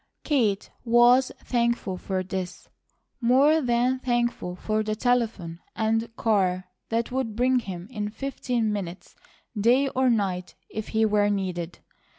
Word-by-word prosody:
Kate 220 Hz, -9 st, +1 dB
was 240 Hz, +2 st, +5 dB
thankful 235 Hz, -5 st, 0 dB
for 185 Hz, 0 st, -3 dB
this, 185 Hz, -1 st, -5 dB, 0.5 s
more 275 Hz, +7 st, +4 dB
than 250 Hz, 0 st, +1 dB
thankful 240 Hz, -7 st, -1 dB
for 215 Hz, +4 st, -1 dB
the 215 Hz, 0 st, -2 dB
telephone 220 Hz, -8 st, 0 dB, 0.2 s
and 225 Hz, +1 st, 0 dB
car 185 Hz, -5 st, +1 dB, 0.2 s
that 230 Hz, +1 st, -1 dB
would 250 Hz, -4 st, -2 dB
bring 255 Hz, +2 st, +3 dB
him 185 Hz, -5 st, -7 dB
in 210 Hz, -3 st, -3 dB
fifteen 240 Hz, -2 st, -2 dB
minutes 185 Hz, -3 st, -6 dB, 0.4 s
day 245 Hz, +6 st, +3 dB
or 260 Hz, 0 st, +2 dB
night, 190 Hz, -6 st, -1 dB, 0.2 s
if 215 Hz, -1 st, -5 dB
he 220 Hz, 0 st, +2 dB
were 205 Hz, -1 st, +3 dB
needed. 180 Hz, -4 st, -3 dB
225 Hz, 135 wpm, -26 LUFS, 195-245 Hz, 0.5 s, was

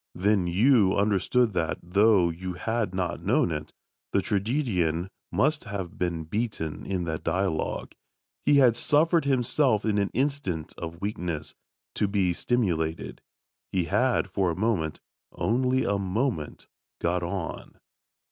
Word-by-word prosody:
Then 100 Hz, -1 st, +2 dB
you 100 Hz, +2 st, +4 dB
understood 105 Hz, +3 st, +2 dB
that, 80 Hz, -4 st, -1 dB
though 95 Hz, 0 st, +4 dB
you 90 Hz, +2 st, -5 dB
had 110 Hz, +1 st, -2 dB
not 90 Hz, -2 st, -2 dB
known 85 Hz, -, +2 dB
it, 75 Hz, -1 st, -4 dB, 0.4 s
the 100 Hz, -, +2 dB
tragedian 100 Hz, -, 0 dB, 0.2 s
must 150 Hz, +2 st, +1 dB
have 100 Hz, -1 st, -6 dB
been 85 Hz, -2 st, -1 dB
beaten 85 Hz, -3 st, -3 dB
in 95 Hz, -2 st, -1 dB
that 80 Hz, -2 st, -4 dB
dialogue. 95 Hz, -4 st, -1 dB, 0.5 s
He 145 Hz, -, +4 dB
had 130 Hz, -5 st, +6 dB
suffered 160 Hz, +5 st, +3 dB
himself 125 Hz, -3 st, +2 dB
in 105 Hz, -2 st, +2 dB
an 100 Hz, -, +1 dB
instant 130 Hz, -, -1 dB
of 85 Hz, 0 st, -7 dB
weakness, 85 Hz, -7 st, -3 dB, 0.4 s
to 105 Hz, -, +1 dB
be 95 Hz, -3 st, +1 dB
stimulated; 85 Hz, -8 st, -1 dB, 0.5 s
he 95 Hz, -2 st, +1 dB
had 105 Hz, +6 st, +1 dB
for 95 Hz, -1 st, 0 dB
a 85 Hz, -, -2 dB
moment 95 Hz, -7 st, -1 dB, 0.3 s
only 130 Hz, +2 st, +1 dB
a 100 Hz, -1 st, +1 dB
moment 100 Hz, -, -2 dB, 0.3 s
got 90 Hz, +1 st, 0 dB
on. 85 Hz, -1 st, -5 dB
100 Hz, 135 wpm, -27 LUFS, 85-115 Hz, 0.5 s, had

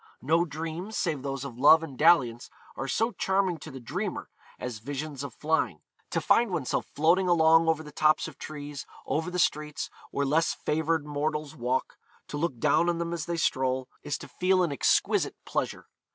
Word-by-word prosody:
No 165 Hz, +5 st, +3 dB
dreams, 165 Hz, +6 st, -5 dB
save 155 Hz, -6 st, -1 dB
those 135 Hz, 0 st, -4 dB
of 125 Hz, -3 st, -8 dB
love 155 Hz, +4 st, +7 dB
and 145 Hz, -5 st, -7 dB
dalliance, 125 Hz, -7 st, +3 dB, 0.3 s
are 135 Hz, -, -4 dB
so 225 Hz, -, +1 dB
charming 190 Hz, -4 st, 0 dB
to 155 Hz, -, -9 dB
the 135 Hz, -2 st, -8 dB
dreamer 120 Hz, -, -4 dB, 0.3 s
as 125 Hz, -3 st, -5 dB
visions 140 Hz, +3 st, -5 dB
of 140 Hz, -, -5 dB
flying; 155 Hz, -, 0 dB, 0.3 s
to -, -, 0 dB
find 235 Hz, -1 st, +3 dB
oneself 165 Hz, -8 st, -1 dB
floating 170 Hz, +5 st, +3 dB
along 165 Hz, -1 st, +5 dB
over 160 Hz, -1 st, +1 dB
the 150 Hz, -, -10 dB
tops 155 Hz, +2 st, +3 dB
of 150 Hz, -4 st, -12 dB
trees, 145 Hz, -2 st, -7 dB, 0.2 s
over 160 Hz, +4 st, -1 dB
the 180 Hz, -, -4 dB
streets 150 Hz, -4 st, 0 dB, 0.2 s
where 140 Hz, -, -1 dB
less 155 Hz, +4 st, +2 dB
favoured 160 Hz, 0 st, 0 dB
mortals 150 Hz, 0 st, -2 dB
walk, 125 Hz, +2 st, -2 dB, 0.3 s
to 145 Hz, -, -4 dB
look 150 Hz, -4 st, -1 dB
down 155 Hz, +6 st, +3 dB
on 170 Hz, -, 0 dB
them 170 Hz, 0 st, -2 dB
as 165 Hz, -3 st, -4 dB
they 170 Hz, -1 st, -2 dB
stroll, 130 Hz, -4 st, 0 dB
is 145 Hz, -, -3 dB
to -, -, -10 dB
feel 185 Hz, 0 st, +2 dB
an 170 Hz, -, 0 dB
exquisite 140 Hz, -, +2 dB
pleasure. -, -, -2 dB
155 Hz, 185 wpm, -28 LUFS, 140-165 Hz, 0.3 s, love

